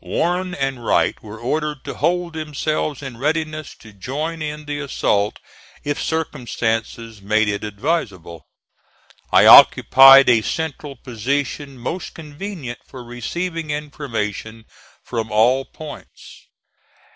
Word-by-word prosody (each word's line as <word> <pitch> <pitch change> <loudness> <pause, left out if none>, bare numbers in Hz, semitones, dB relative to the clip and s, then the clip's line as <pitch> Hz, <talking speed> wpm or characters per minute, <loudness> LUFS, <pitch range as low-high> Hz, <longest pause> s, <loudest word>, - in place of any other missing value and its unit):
Warren 180 +1 -1
and 135 -4 -3
Wright - - +1
were 105 0 -10
ordered 150 +3 -2
to - - -5
hold 175 +2 -1
themselves 155 -1 -3
in 130 -4 -7
readiness 155 +2 -2
to 110 -2 -16
join 150 +11 -4
in 150 0 -5
the 145 0 -4
assault 105 -7 0 0.5
if 145 0 -2
circumstances 115 -7 -3
made 110 +2 +1
it 100 0 -2
advisable. 100 - -3 0.8
I - - +6
occupied 135 +1 +9
a 120 -3 +5
central 150 +1 -4
position 135 +3 -3
most 145 +10 -5
convenient 150 -4 -7
for 130 -2 -11
receiving 165 +7 -5
information 115 -7 -5 0.4
from 115 -3 -4
all 125 +5 +3
points. 155 -1 -12
135 Hz, 115 wpm, -20 LUFS, 115-155 Hz, 0.8 s, occupied